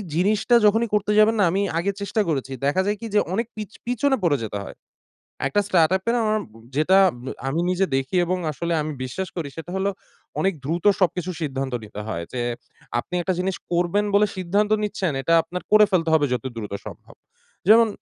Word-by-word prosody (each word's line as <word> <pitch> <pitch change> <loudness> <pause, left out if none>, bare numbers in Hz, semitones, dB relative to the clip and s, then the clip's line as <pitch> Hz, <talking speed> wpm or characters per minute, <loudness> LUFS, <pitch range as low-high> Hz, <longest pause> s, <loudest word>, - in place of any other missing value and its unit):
জিনিসটা 210 +7 +3
যখনই 225 +2 +3
করতে 210 0 +1
যাবেন 215 +1 +5
না? - - +5
আমি 195 +3 +1 0.2
আগে 195 +4 0
চেষ্টা 210 +2 0
করেছি, 135 -3 -2
দেখা 145 +7 +2
যায় 210 - 0
কি? 230 - -5
যে - - +6
অনেক 225 +4 -1
পিছ 215 -1 -6
পিছনে 250 +3 +1
পড়ে 150 -5 +3
যেতে 105 -1 -4
হয়। - - -10 0.7
একটা 205 +9 +2
স্টার্টআপ 185 0 +3
এ - - +4 0.2
অম 215 - 0 0.3
যেটা 155 +6 +4 0.5
আমি 160 +5 0
নিজে 185 +1 +2
দেখি 135 +5 -2
এবং 185 +2 0
আসলে 170 +3 -2
আমি 155 +1 -3
বিশ্বাস 180 +9 -4
করি 155 -5 -3
সেটা 165 +2 -7
হলো 195 +1 +1 0.5
অনেক 195 0 +2
দ্রুত 170 +6 -2 0.2
সবকিছু 185 0 +1
সিদ্ধান্ত 135 -3 -3
নিতে 105 0 -9
হয়। 85 -6 -3
যে 125 - -2 0.6
আপনি 180 - -6
একটা 185 +2 0
জিনিস 185 0 -1 0.2
করবেন 175 +4 +1
বলে 210 +1 +5
সিদ্ধান্ত 200 +4 0
নিচ্ছেন, 200 -4 -1
এটা 165 - +1
আপনার 180 +1 -6
করে 215 0 +8
ফেলতে 165 -3 +2
হবে 150 -2 +4
যত 125 0 -3
দ্রুত 105 -3 -6
সম্ভব। - - -11 0.6
যেমন 230 +1 +7
185 Hz, 190 wpm, -23 LUFS, 155-205 Hz, 0.7 s, করে